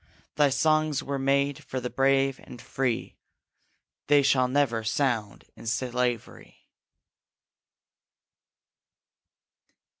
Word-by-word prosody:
Thy 145 -1 +3
songs 155 +1 +1
were 140 0 -3
made 140 +1 0
for 130 - -4
the 125 0 -5
brave 135 0 +2
and 120 - -12
free, 125 -1 -3 0.9
They 145 -1 +5
shall 130 -2 +3
never 125 -4 0
sound 110 -3 -1
in - - -11
slavery!' 125 0 -3
135 Hz, 90 wpm, -26 LUFS, 125-140 Hz, 0.9 s, They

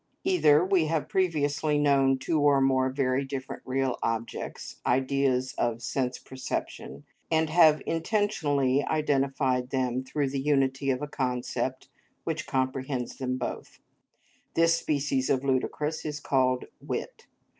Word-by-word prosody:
Either, 175 - +4
we 185 -4 +2
have 155 -1 -1
previously 150 -4 +1
known 135 -2 +3
two 155 +4 0
or 145 -1 +4
more 130 -1 +2
very 130 0 0
different 135 -1 -6
real 130 -1 0
objects, 115 0 -4
ideas 130 0 +1
of 115 -1 0
sense 130 0 -1
perception, 130 0 -6 0.3
and 160 -1 +1
have 155 -2 +5
intentionally 155 - +1
identified 135 -4 0
them 130 -1 -1
through 140 +2 -1
the 135 +1 -2
unity 135 -1 +1
of 130 +1 0
a - - -2
concept 130 -4 -2 0.4
which - - -3
comprehends 130 -1 -2
them 130 -1 -2
both; 125 - -6 0.8
this 165 0 +4
species 140 -4 -1
of 135 -2 +2
the 140 - -5
ludicrous 150 +4 -1
is 150 -1 -4
called 130 -2 +1 0.2
wit. - - -5
135 Hz, 135 wpm, -28 LUFS, 130-150 Hz, 0.8 s, have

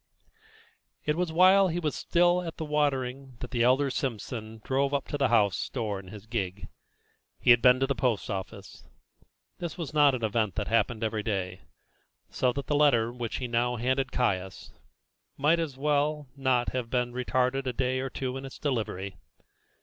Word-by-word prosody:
It 150 - +1
was 175 -1 -1
while 185 +3 +6
he 170 -1 -2
was 155 -4 -1
still 175 +1 +2
at 165 -2 -6
the 160 - -4
watering 135 -3 -1
that 125 - -7
the 120 -3 0
elder 130 +3 +3
Simpson 110 -3 -4
drove 140 +1 +1
up 140 - -2
to 145 - -2
the 135 - +3
house 105 -6 +2
door 110 -6 -3
in 95 - -12
his 105 +1 -10
gig. 100 -5 -4 0.7
He - - +5
had 120 -1 +6
been 125 0 +6
to 135 - +2
the 140 - 0
post 120 -4 0
office. 95 -1 -7 0.8
This 170 -4 -5
was 160 -4 -5
not 145 -3 +5
an 120 - -6
event 110 -1 0
that 105 - -2
happened 115 0 +1
every 110 -1 -1
day, 95 -4 -3 0.7
so 125 - +1
that 140 +1 -4
the - - -1
letter 120 -6 +3
which 120 -2 -4
he 125 - -3
now 120 +1 0
handed 130 +3 0
Caius 95 -6 -2 0.6
might 150 +4 +3
as 150 -5 -3
well 150 +1 0
as 140 - -31
not 130 -2 +2
have 125 -2 -3
been 125 -1 0
retarded 130 +1 0
a - - +1
day 130 +1 0
or 135 +1 -3
two 130 0 -4
in 135 - -7
its 135 - -9
delivery. 100 -8 -3
130 Hz, 190 wpm, -28 LUFS, 115-145 Hz, 0.8 s, while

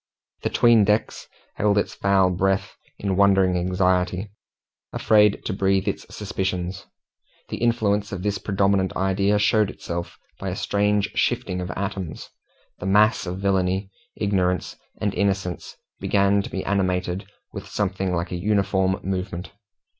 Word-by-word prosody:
The - - -1
'tween 115 -3 +5
decks 105 +2 0 0.3
held 105 0 +2
its 100 - 0
foul 95 -2 +3
breath 95 +2 0 0.2
in 100 -2 -1
wondering 95 -2 +4
anxiety, 90 +2 0 0.6
afraid 105 -2 +3
to 105 - -1
breathe 95 0 +1
its - - -3
suspicions. 95 -2 -3 0.6
The - - -4
influence 105 -3 +1
of 95 -2 -5
this 100 -2 -1
predominant 100 -1 +1
idea 100 +2 +2
showed 105 0 +3
itself 85 0 -6 0.2
by 95 - -3
a 90 - -3
strange 105 0 +1
shifting 90 0 0
of 90 - -5
atoms. 95 -4 -5 0.5
The 95 - -4
mass 105 0 +3
of 90 +1 -3
villainy, 95 0 0 0.2
ignorance, 95 -3 0 0.2
and 100 - -1
innocence 95 -3 -2 0.2
began 100 0 +2
to - - -7
be 95 - -4
animated 95 -1 -1 0.3
with 100 -1 -7
something 95 -2 -1
like 85 0 -2
a 90 - -2
uniform 95 -2 +1
movement. 95 -1 -4
95 Hz, 140 wpm, -23 LUFS, 95-100 Hz, 0.6 s, tween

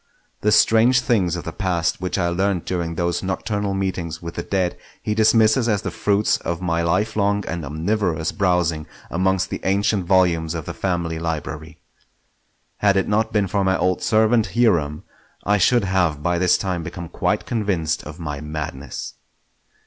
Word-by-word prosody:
The 105 - +2
strange 115 +4 +5
things 95 -10 +1
of 85 - -5
the 80 - -5
past 90 -2 -1
which 90 - -2
I 85 - +1
learnt 95 0 0
during 85 -2 -2
those 85 0 -1
nocturnal 100 +1 -2
meetings 90 -4 -3
with 85 0 -7
the - - -4
dead 95 -3 -1 0.2
he 105 - -2
dismisses 110 +2 +4
as 105 -3 0
the - - -3
fruits 105 +1 +1
of 85 -1 -4
my 85 -2 0
lifelong 100 +3 +1
and 85 -1 -4
omnivorous 80 +2 -1
browsing 90 -5 0 0.2
amongst 95 +2 0
the - - -4
ancient 100 0 +1
volumes 85 -3 +2
of 80 -3 -5
the - - -5
family 85 -3 -2
library. 80 -1 -5 1.0
Had 100 -1 +3
it 95 - +1
not 110 +1 +1
been 105 -3 +2
for 100 +1 0
my 95 0 +2
old 90 0 0
servant 110 +1 +2
Hiram, 85 -11 +2 0.4
I 105 +1 +2
should 120 +5 +4
have 90 -6 0
by 85 +1 +1
this 90 0 +4
time 90 -3 -2
become 85 +1 -7
quite - - -1
convinced 95 -9 -1
of 75 +2 -10
my 75 -3 -5
madness. 75 -4 -6
90 Hz, 170 wpm, -21 LUFS, 85-100 Hz, 1.0 s, strange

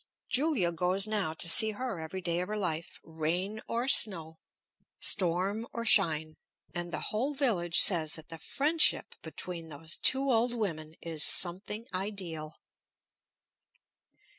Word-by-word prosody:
Julia 260 - 0
goes 180 +3 0
now 205 -7 -2
to 165 - +4
see 220 +5 +9
her 225 -4 -6
every 160 +4 -7
day 170 -1 -2
of 180 - -4
her 215 +1 -4
life, 165 -5 -4
rain 175 +7 -4
or 235 +2 -3
snow, 165 - +2 0.6
storm 195 +4 -1
or 230 0 -5
shine; 160 -9 +2 0.4
and 175 0 -6
the 155 - -5
whole 260 +7 -3
village 190 - +1
says 160 -5 +4
that 160 -1 -9
the 165 - -10
friendship 310 - +1
between 170 -3 -6
those 160 +3 -5
two 270 +1 +3
old 240 +1 0
women 160 -8 -5
is 160 -2 -4
something 195 +5 0
ideal. 185 -6 -6
180 Hz, 140 wpm, -29 LUFS, 165-220 Hz, 0.6 s, see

